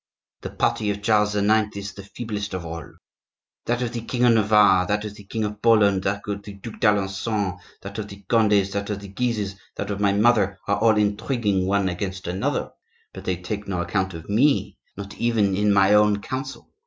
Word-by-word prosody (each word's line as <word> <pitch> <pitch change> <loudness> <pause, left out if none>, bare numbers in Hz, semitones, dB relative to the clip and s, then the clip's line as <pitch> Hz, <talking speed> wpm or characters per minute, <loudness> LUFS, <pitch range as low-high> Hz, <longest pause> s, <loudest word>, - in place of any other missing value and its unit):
The - - -5
party 105 - 0
of 100 0 -3
Charles 105 -1 +2
IX. 105 0 +2
is 100 -1 -6
the 100 - -9
feeblest 100 -1 -5
of 90 -2 -5
all. 85 -2 -7 0.7
That 120 +1 0
of 120 -1 -3
the 120 - -3
king 120 +2 -2
of 120 - +6
Navarre, 105 -4 +4
that 105 +2 -1
of 105 - -6
the 105 -1 -14
king 110 +2 -3
of 105 0 -4
Poland, 105 -4 +4
that 100 +1 -2
of 100 -1 -3
the 100 0 -10
Duc 105 +3 -10
d'Alencon, 100 -2 0 0.2
that 100 +2 -7
of 105 - -4
the 100 0 -12
Condes, 105 -4 +3
that 100 +1 -3
of 105 -1 -2
the 100 -1 -10
Guises, 105 -3 -2 0.2
that - - -4
of 100 - -3
my 100 -1 +3
mother, 105 -2 +3
are 100 - +1
all 110 -1 +4
intriguing 105 -2 0
one 100 0 +1
against 95 +1 -4
another, 90 +2 -2 0.4
but - - -10
they 95 - 0
take 100 +4 -5
no 95 -3 -2
account 95 0 -1
of 80 0 -9
me, 130 +8 +2 0.2
not 100 -1 -7
even 110 -5 +2
in 105 +1 +2
my 100 0 +4
own 105 0 +4
council. 130 +5 -6
105 Hz, 205 wpm, -23 LUFS, 100-110 Hz, 0.7 s, of